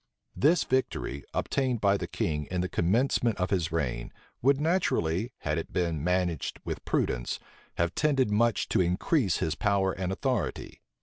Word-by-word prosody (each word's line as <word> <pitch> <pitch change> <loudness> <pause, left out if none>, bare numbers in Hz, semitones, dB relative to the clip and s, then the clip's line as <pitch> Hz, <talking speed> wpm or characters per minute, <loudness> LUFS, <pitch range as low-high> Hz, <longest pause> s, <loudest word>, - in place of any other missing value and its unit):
This 160 +5 +4
victory, 130 - -1
obtained 130 -4 0
by 100 -1 +3
the - - -3
king 75 -2 -2
in 90 -1 -1
the 90 - -1
commencement 115 +6 +1
of 90 0 -1
his 85 -4 0
reign, 65 -7 -2 0.3
would 135 +2 +4
naturally, 120 - +1
had 75 +2 0
it 80 - -7
been 85 -5 -1
managed 90 -3 0
with - - -4
prudence, - - -1 0.4
have 85 +1 0
tended 135 -7 +2
much 115 +2 +2
to - - +3
increase 90 - +1
his 80 - 0
power 100 0 +1
and 95 0 -3
authority. 115 - -2
95 Hz, 160 wpm, -28 LUFS, 85-125 Hz, 0.4 s, This